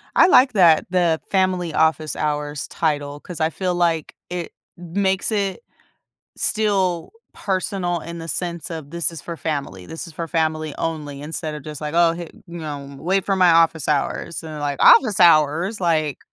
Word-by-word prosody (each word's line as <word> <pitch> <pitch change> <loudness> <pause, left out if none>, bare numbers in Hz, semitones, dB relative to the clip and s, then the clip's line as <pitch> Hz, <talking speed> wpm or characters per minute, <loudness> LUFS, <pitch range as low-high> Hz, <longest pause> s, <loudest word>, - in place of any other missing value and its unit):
I - - +7
like 260 -7 +5
that, 170 -6 +5
the 175 -3 +1
family 185 -3 0
office 160 0 +1
hours 150 -1 -2
title, 145 -2 -2
'cause 170 +2 -8
I 160 - +2
feel 180 +2 -2
like 170 -3 0
it 175 -1 -5 0.3
m 170 -1 -11
makes 190 +2 +1
it 200 - -1 0.8
still 195 -6 +1 0.2
personal 185 -2 -2
in 170 +2 -8
the 165 0 -8
sense 170 -2 -3
of 160 -4 -7
"This 170 +1 0
is 160 - -9
for 170 - -6
family, 140 - -4
this 160 - -7
is 165 - -12
for 165 +2 -5
family 155 -2 -1
only," 150 -4 -4
instead 155 +1 -4
of 150 - -8
just 150 0 -8
like, 150 0 -4
"Oh, 170 -1 +4
hey 170 0 -7 0.2
you, 170 -1 -8
um, 140 -2 -7
wait 190 +4 0
for 195 - 0
my 180 -2 +5
office 165 -2 +3
hours." 150 +3 -1
And, 160 -1 -8
they're 150 - -7
like 145 -1 -2
"Office 220 -6 +6
hours?" 170 +4 +4
Like 155 -5 0
165 Hz, 185 wpm, -21 LUFS, 155-180 Hz, 0.8 s, I